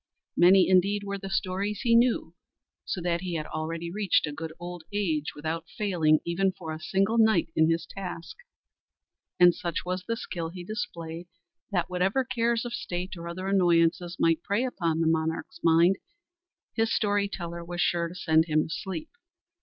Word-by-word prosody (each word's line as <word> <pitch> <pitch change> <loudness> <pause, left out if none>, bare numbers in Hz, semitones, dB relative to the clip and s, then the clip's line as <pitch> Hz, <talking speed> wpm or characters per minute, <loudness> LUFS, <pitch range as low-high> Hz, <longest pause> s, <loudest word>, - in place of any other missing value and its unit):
Many 185 +2 +6
indeed 195 +2 +3
were 200 0 -4
the 195 0 -6
stories 195 +2 -1
he 235 - +2
knew, 235 -7 +3 0.5
so 180 - -3
that 170 0 0
he 180 -2 -3
had 155 -2 -2
already 165 +2 -4
reached 200 -1 +2
a 150 - -4
good 160 +2 -6
old 175 -1 -7
age 160 -7 -1
without 160 +2 -4
failing 165 -7 +2
even 190 +3 +1
for 165 -4 -7
a 155 - -6
single 195 +7 +1
night 220 -7 +3
in 160 0 +4
his 165 0 0
task; 175 -3 -7 1.0
and 175 -1 +8
such 170 0 -4
was 180 0 -2
the 230 +4 -2
skill 170 -6 -4
he 175 +1 -8
displayed 175 -6 -5 0.4
that 180 -3 0
whatever 190 +8 +1
cares 235 -1 0
of 240 - -5
state 190 -5 -4
or 170 -1 -7
other 180 +2 -5
annoyances 175 -2 +2
might 165 -1 +3
prey 205 +6 0
upon 170 -9 -1
the 165 - +2
monarch's 160 +1 -1
mind, 170 +3 +5 0.8
his 225 0 +1
story 205 -1 +1
teller 170 -3 -6
was 175 +1 -6
sure 170 -1 +1
to 170 - -10
send 160 -2 +3
him 155 -2 +2
to - - -8
sleep. 260 +11 -5
175 Hz, 175 wpm, -27 LUFS, 165-200 Hz, 1.0 s, and